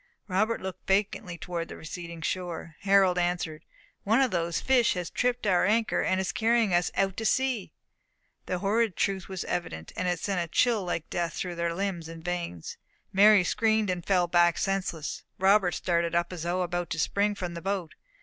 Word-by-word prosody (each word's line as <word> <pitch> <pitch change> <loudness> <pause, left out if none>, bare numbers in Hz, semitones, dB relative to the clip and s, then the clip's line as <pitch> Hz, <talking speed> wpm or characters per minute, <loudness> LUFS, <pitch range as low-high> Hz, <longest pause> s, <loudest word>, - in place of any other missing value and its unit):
Robert 215 +4 0
looked 190 -1 -7
vacantly 195 -2 0
towards 170 -1 -4
the - - -8
receding 170 0 -8
shore. 170 -2 -4
Harold 195 -2 +4
answered, 175 -3 -2 0.4
"One 225 +5 +3
of 265 -3 +3
these 170 -2 0
fish 255 -6 +3
has 180 -1 -4
tripped 245 -1 0
our 185 -3 +3
anchor, 220 +3 +2
and 185 - +1
is 190 - -1
carrying 225 -3 +2
us 175 0 +3
out 195 -1 +1
to 225 - -3
sea." 255 -2 0 0.8
The 180 - -1
horrid 210 +2 +1
truth 195 -2 -1
was 190 -2 -4
evident; 80 - -4
and 185 - -2
it 175 -2 0
sent 190 0 -1
a 170 -1 -5
chill 230 -5 +3
like 175 -3 -3
death 170 -2 -1
through 180 -1 -4
their 170 0 -2
limbs 180 -4 -3
and 165 0 -10
veins. 175 - -4 0.4
Mary 205 0 +7
screamed 220 0 +1
and 175 -1 -3
fell 180 -2 +2
back 175 -1 +3
senseless. 190 -5 -2 0.2
Robert 190 -1 +4
started 170 -1 0
up 170 +1 0
as 175 - -6
though 175 +2 0
about 175 -1 -3
to 165 - -3
spring 205 +5 +1
from 180 -3 -4
the 170 - -6
boat. 190 -3 -3
180 Hz, 190 wpm, -28 LUFS, 170-200 Hz, 0.8 s, Mary